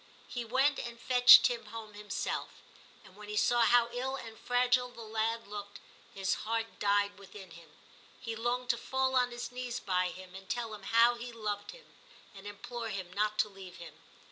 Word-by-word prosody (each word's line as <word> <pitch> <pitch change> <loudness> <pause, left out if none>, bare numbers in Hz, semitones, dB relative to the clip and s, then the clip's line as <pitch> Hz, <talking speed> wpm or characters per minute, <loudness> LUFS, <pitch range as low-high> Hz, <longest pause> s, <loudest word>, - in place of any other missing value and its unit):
He 245 - -4
went 265 +5 +2
and 235 0 -6
fetched 245 0 +8
Tim 240 -2 0
home 220 -1 -8
himself, 205 -1 -4 0.4
and 190 -1 -17
when 210 0 -11
he 210 - -3
saw 240 +2 +3
how 240 0 +5
ill 255 +2 -3
and 225 -4 -8
fragile 250 +2 +1
the 235 -1 -11
lad 225 +1 -2
looked, 205 0 -8 0.3
his 190 -1 -1
heart 225 +1 -3
died 200 0 +1
within 195 -2 -12
him; 165 -1 -14 0.5
he 230 -2 -5
longed 240 +2 -2
to 235 - -4
fall 265 +1 -1
on 250 -1 +3
his 240 0 -6
knees 250 -1 -4
by 185 -2 0
him 185 0 -11
and 190 0 -11
tell 235 -3 -3
him 210 - -8
how 230 +1 +6
he 240 +1 -7
loved 210 -3 -4
him, - - -11 0.5
and 200 0 -11
implore 230 +3 -6
him 190 -3 -5
not 210 +2 0
to 215 0 +3
leave 195 -3 -12
him. 165 -3 -10
225 Hz, 195 wpm, -32 LUFS, 205-245 Hz, 0.5 s, fetched